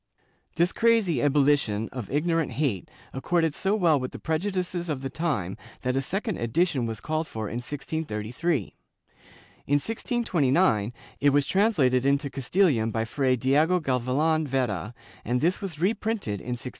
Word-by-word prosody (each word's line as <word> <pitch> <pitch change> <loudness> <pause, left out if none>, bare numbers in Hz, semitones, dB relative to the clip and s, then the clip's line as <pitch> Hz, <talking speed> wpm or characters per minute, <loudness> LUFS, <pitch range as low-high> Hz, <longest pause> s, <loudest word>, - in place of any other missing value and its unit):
^ - - -34
This 170 +3 +2
crazy 225 - +3
ebul 145 +2 +3
lition 115 -7 +1
of 125 -6 -7
ignorant 160 -1 0
hate 120 - -1 0.2
accorded 165 +3 +1
so 195 +6 0
well 170 -8 +3
with 130 0 -4
the - - -6
prejudices 180 +1 -2
of 140 -3 -3
the 135 - -4
time 140 - -2 0.3
that 125 0 0
a 135 - +1
second 195 - -2
edition 130 +1 +1
was 110 -2 -5
called 155 +4 -2
for 110 -1 -5
in 115 - -4
1633; 135 - -3 0.9
in 145 - 0
1629 160 - +1 0.3
it 145 - +4
was 145 0 +3
translated 150 - +2
into 140 0 +1
Castilian 135 - +2
by 110 0 -1
Fray 130 +2 +1
Diego 150 +8 +3
Gavilan 145 +3 +1
Vera, 120 - -2 0.3
and 125 +1 0
this 175 +6 +1
was 180 -6 -5
reprinted 200 - -1
in 125 0 -3
1680. 125 - -6
145 Hz, 155 wpm, -26 LUFS, 125-170 Hz, 0.9 s, it